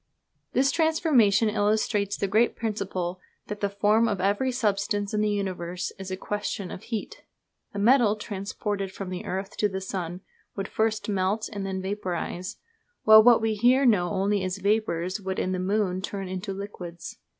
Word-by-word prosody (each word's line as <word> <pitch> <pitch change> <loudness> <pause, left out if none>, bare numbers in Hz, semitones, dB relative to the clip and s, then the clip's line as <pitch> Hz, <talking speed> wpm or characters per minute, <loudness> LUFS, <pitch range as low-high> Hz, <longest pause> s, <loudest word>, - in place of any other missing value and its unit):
This 270 +2 +3
transformation 280 - +3
illustrates 210 -1 +1
the 200 - -1
great 220 +5 +2
principle 195 -5 -3 0.3
that 205 0 -6
the 200 - 0
form 210 +3 +3
of 205 -4 -1
every 205 +7 +1
substance 205 -3 0
in 210 - +1
the 215 - +2
universe 180 -3 -3
is 190 0 -6
a 185 - -3
question 205 -2 -4
of - - -7
heat. 225 -3 -5 0.5
A - - -3
metal 225 0 +4
transported 200 -1 -4
from 190 -1 -6
the 180 - -5
earth 190 +2 -4
to 210 - +2
the 190 0 -3
sun 185 -2 -5 0.3
would 195 0 -3
first 220 -1 -1
melt 200 +2 0
and 200 -1 -4
then 190 -1 -3
vaporise; 185 -2 -3 0.5
while 220 0 +9
what 235 0 +6
we 220 -1 +2
here 245 +6 +4
know 190 -7 +4
only 200 0 0
as 185 0 -2
vapours 200 -2 0
would 190 -1 -3
in 185 - -1
the 185 - -1
moon 190 -1 0
turn 195 0 -4
into 185 +2 -4
liquids. 190 -3 -7
200 Hz, 170 wpm, -26 LUFS, 190-215 Hz, 0.5 s, while